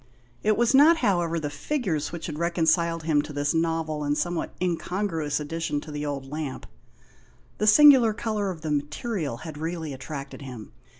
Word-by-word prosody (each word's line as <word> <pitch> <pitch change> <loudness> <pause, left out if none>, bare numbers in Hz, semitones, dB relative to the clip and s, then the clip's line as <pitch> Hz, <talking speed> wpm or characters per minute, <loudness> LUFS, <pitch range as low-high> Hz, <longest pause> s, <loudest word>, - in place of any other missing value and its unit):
It 215 0 +2
was 240 +1 +3
not, 305 +5 +7
however, 175 - +1
the 145 -2 -4
figures 155 - -2
which 170 -2 -6
had 155 -2 -5
reconciled 170 -1 +1
him 155 -2 +2
to 150 +1 -8
this 145 +1 -1
novel 160 -2 -1
and 145 0 0
somewhat 175 -1 -2
incongruous 175 -3 -1
addition 150 0 -3
to 155 - -10
the 150 0 -4
old 140 -2 -4
lamp. 145 -1 -5 0.9
The 210 - +1
singular 260 -1 +8
colour 210 -2 -2
of 170 -4 -6
the 155 -2 -3
material 150 - -2
had 155 -2 -7
really 160 -2 -4
attracted 140 +2 -7
him. 125 -6 -9
160 Hz, 170 wpm, -26 LUFS, 145-185 Hz, 0.9 s, singular